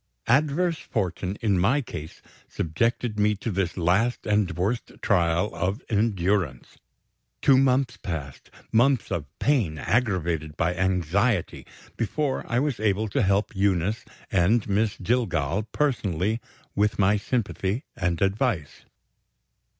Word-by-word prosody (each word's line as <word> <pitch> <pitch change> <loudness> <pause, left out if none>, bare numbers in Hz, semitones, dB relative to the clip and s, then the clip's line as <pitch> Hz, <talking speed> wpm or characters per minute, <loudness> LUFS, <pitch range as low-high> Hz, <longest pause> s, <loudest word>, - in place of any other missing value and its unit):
Adverse 155 +6 +2
fortune, 95 -2 -3
in 100 -5 +2
my 115 +11 +3
case, 80 - -8 0.3
subjected 115 +6 -1
me 105 0 +3
to 110 +3 -4
this 95 -2 -1
last 95 +8 +1
and 105 -3 +2
worst 105 +7 -1
trial 90 +1 +1
of 95 +7 -2
endurance. 100 - 0 0.6
Two 135 - +5
months 130 -2 +2
passed 75 -7 -6 0.2
months 120 +1 +3
of 75 - -2
pain 115 - +1
aggravated 85 - 0
by 90 +1 +1
anxiety 95 +3 0 0.3
before 130 +5 -1
I 120 - +1
was 140 -1 0
able 110 0 +1
to - - 0
help 100 +1 +1
Eunice 95 +2 +1 0.3
and 100 +5 +3
Miss 105 +1 +1
Jillgall 105 - 0
personally 110 - 0 0.3
with 105 +1 +1
my 100 +1 +4
sympathy 105 +1 -2
and 90 -1 0
advice. 100 - -1
100 Hz, 120 wpm, -25 LUFS, 90-120 Hz, 0.6 s, Two